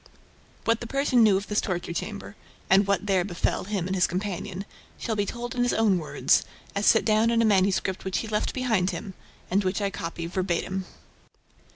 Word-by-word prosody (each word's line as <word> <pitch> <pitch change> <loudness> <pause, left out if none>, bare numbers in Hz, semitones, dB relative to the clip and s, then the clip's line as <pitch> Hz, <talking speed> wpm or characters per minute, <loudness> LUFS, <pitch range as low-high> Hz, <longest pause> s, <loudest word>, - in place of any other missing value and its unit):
What 230 0 +2
the 240 - -6
Persian 275 -1 +2
knew 210 -4 +6
of 200 - -4
this 210 0 0
torture 175 -2 -3
chamber 205 +2 -5 0.4
and 195 +1 +5
what 200 -1 +1
there 190 -3 +2
befell 175 -1 -1
him 195 -3 -2
and 190 - -2
his 180 - +3
companion 190 0 -4 0.3
shall 225 - -2
be 205 -1 0
told 240 +1 -5
in 245 - -1
his 245 - +2
own 210 -5 +3
words, 155 - +2 0.3
as 200 +1 +1
set 225 - +5
down 220 +1 +3
in 235 0 +2
a 230 - +4
manuscript 190 -2 +2
which 190 -1 -1
he 225 - -3
left 215 -1 -1
behind 220 -8 +1
him, 190 +2 -5 0.4
and 200 +2 +2
which 185 +2 0
I 200 -1 -1
copy 165 -1 -5
VERBATIM. 185 +1 -2
200 Hz, 200 wpm, -26 LUFS, 185-220 Hz, 0.4 s, knew